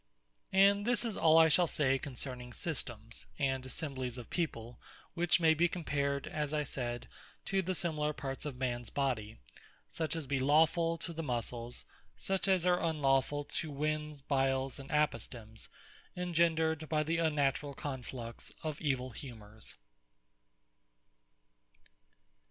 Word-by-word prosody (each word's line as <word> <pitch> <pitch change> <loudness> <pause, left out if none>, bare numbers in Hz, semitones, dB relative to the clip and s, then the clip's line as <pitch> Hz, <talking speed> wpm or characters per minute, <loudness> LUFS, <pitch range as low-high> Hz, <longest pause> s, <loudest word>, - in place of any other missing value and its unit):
And 200 +1 +5
this 245 +2 +1
is 225 -3 -2
all 160 0 +5
I 160 0 +8
shall 165 +3 +5
say 135 -3 +2
concerning 125 -2 -6
Systemes, 120 -8 -5
and 135 -2 0
Assemblyes 130 -3 -3
of 120 - -9
People, 120 -9 -2 0.3
which 175 -1 +3
may 160 -2 +6
be 170 +2 +4
compared 140 -5 -1
(as 150 0 -2
I 150 - +1
said,) 120 -3 -4 0.4
to 195 0 +1
the 185 0 -2
Similar 155 -4 0
parts 135 -2 -5
of 150 -3 -4
mans 120 -3 -2
Body; 120 -6 -1 0.5
such 160 0 -1
as 160 -3 -3
be 135 0 0
Lawfull, 160 +4 +4
to 170 - -4
the 165 - -3
Muscles; 120 -3 -3 0.3
such 195 0 -1
as 185 -2 +3
are 180 0 +4
Unlawfull, 145 -2 +2
to 160 - -2
Wens, 150 0 -2
Biles, 135 -1 +1
and 135 - -9
Apostemes, 120 -7 -1 0.5
engendred 160 -3 +2
by 155 -1 +2
the 165 +2 0
unnaturall 145 -3 +1
conflux 125 -4 -5
of 155 -2 -3
evill 130 -4 0
humours. 110 -4 -6
145 Hz, 135 wpm, -33 LUFS, 130-160 Hz, 0.5 s, I